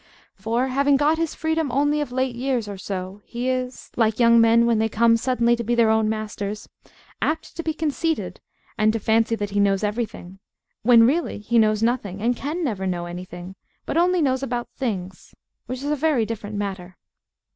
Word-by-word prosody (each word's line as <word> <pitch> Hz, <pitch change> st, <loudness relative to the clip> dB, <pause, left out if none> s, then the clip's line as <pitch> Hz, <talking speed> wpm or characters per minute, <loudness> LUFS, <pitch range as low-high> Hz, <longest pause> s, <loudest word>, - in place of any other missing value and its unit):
For, 230 Hz, +6 st, -1 dB
having 280 Hz, +2 st, +3 dB
got 300 Hz, +3 st, +2 dB
his 330 Hz, -2 st, -2 dB
freedom 320 Hz, -3 st, -1 dB
only 290 Hz, +3 st, +1 dB
of 290 Hz, -, -4 dB
late 260 Hz, -1 st, -1 dB
years 250 Hz, -3 st, -1 dB
or 200 Hz, -, -5 dB
so, 190 Hz, +1 st, -6 dB
he 245 Hz, +1 st, -5 dB
is, 255 Hz, 0 st, -3 dB
like 220 Hz, -1 st, +1 dB
young 235 Hz, -1 st, +6 dB
men 230 Hz, +1 st, +5 dB
when 230 Hz, -2 st, +2 dB
they 220 Hz, 0 st, +1 dB
come 230 Hz, +1 st, +4 dB
suddenly 240 Hz, 0 st, +2 dB
to 235 Hz, -, -4 dB
be 240 Hz, +2 st, 0 dB
their 230 Hz, -2 st, +4 dB
own 220 Hz, -1 st, +2 dB
masters, 210 Hz, -1 st, -4 dB, 0.5 s
apt 315 Hz, -, -2 dB
to -, -, -3 dB
be 320 Hz, -1 st, -3 dB
conceited, 320 Hz, +1 st, -2 dB, 0.4 s
and 215 Hz, 0 st, +4 dB
to 225 Hz, -, -1 dB
fancy 225 Hz, +2 st, +2 dB
that 205 Hz, -2 st, -4 dB
he 205 Hz, -, 0 dB
knows 200 Hz, 0 st, +2 dB
everything, 205 Hz, -4 st, -4 dB, 0.4 s
when 230 Hz, 0 st, +6 dB
really 315 Hz, +8 st, 0 dB
he 230 Hz, +3 st, +1 dB
knows 215 Hz, 0 st, +2 dB
nothing, 225 Hz, -5 st, -1 dB
and 240 Hz, +3 st, +1 dB
can 305 Hz, +8 st, -3 dB
never 205 Hz, -9 st, -2 dB
know 175 Hz, -2 st, -2 dB
anything, 175 Hz, +1 st, -8 dB, 0.3 s
but -, -, -3 dB
only 350 Hz, 0 st, +3 dB
knows 260 Hz, -2 st, +1 dB
about 245 Hz, -3 st, -3 dB
things, 190 Hz, -8 st, -5 dB, 0.3 s
which 255 Hz, +3 st, -5 dB
is 290 Hz, -, -1 dB
a -, -, +2 dB
very 295 Hz, -6 st, +1 dB
different 215 Hz, -1 st, -6 dB
matter. 190 Hz, -3 st, -5 dB
235 Hz, 195 wpm, -23 LUFS, 210-265 Hz, 0.5 s, young